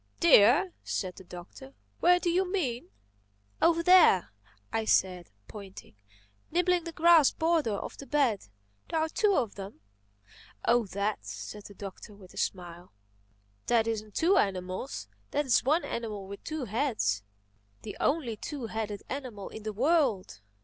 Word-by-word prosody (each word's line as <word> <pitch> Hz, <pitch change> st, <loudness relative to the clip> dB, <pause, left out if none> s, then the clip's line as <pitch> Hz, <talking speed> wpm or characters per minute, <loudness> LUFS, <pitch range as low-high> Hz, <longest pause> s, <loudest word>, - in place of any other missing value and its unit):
"Deer!" 300 Hz, -, +6 dB
said 185 Hz, -2 st, -3 dB
the -, -, -12 dB
Doctor. 180 Hz, +10 st, -11 dB, 0.2 s
"Where 355 Hz, +1 st, +5 dB
do 350 Hz, -1 st, 0 dB
you 365 Hz, +1 st, +1 dB
mean?" 260 Hz, -12 st, -2 dB, 0.7 s
"Over 335 Hz, 0 st, +3 dB
there," 335 Hz, -, +6 dB, 0.4 s
I 225 Hz, -, 0 dB
said, 180 Hz, -4 st, +1 dB, 0.2 s
pointing—"nibbling 190 Hz, -, -4 dB
the 335 Hz, -, -5 dB
grass 330 Hz, -2 st, +6 dB
border 320 Hz, -9 st, 0 dB
of -, -, -7 dB
the 275 Hz, -, -9 dB
bed. 270 Hz, -9 st, +1 dB, 0.4 s
There 325 Hz, -, 0 dB
are 320 Hz, 0 st, 0 dB
two 405 Hz, +3 st, +2 dB
of 230 Hz, -, 0 dB
them." 195 Hz, -, -9 dB, 0.8 s
"Oh, 235 Hz, -2 st, +3 dB
that," 200 Hz, +2 st, -2 dB
said 210 Hz, -1 st, -8 dB
the 200 Hz, -, -12 dB
Doctor 200 Hz, +2 st, -9 dB
with 190 Hz, -3 st, -15 dB
a -, -, -15 dB
smile. 175 Hz, -1 st, -4 dB, 0.8 s
"That 230 Hz, -2 st, +3 dB
isn't 215 Hz, -2 st, -4 dB
two 365 Hz, +4 st, +3 dB
animals: 185 Hz, +5 st, -2 dB, 0.2 s
that's 280 Hz, -4 st, +2 dB
one 305 Hz, +6 st, +2 dB
animal 215 Hz, -4 st, -5 dB
with 200 Hz, +1 st, -9 dB
two 310 Hz, -4 st, -4 dB
heads—the 105 Hz, -, -4 dB
only 270 Hz, -7 st, 0 dB
two 280 Hz, +2 st, -6 dB
headed 215 Hz, -2 st, -4 dB
animal 250 Hz, -8 st, -6 dB
in 220 Hz, -, -9 dB
the 215 Hz, +1 st, -4 dB
world. 235 Hz, -, +1 dB
225 Hz, 140 wpm, -29 LUFS, 190-310 Hz, 0.8 s, Deer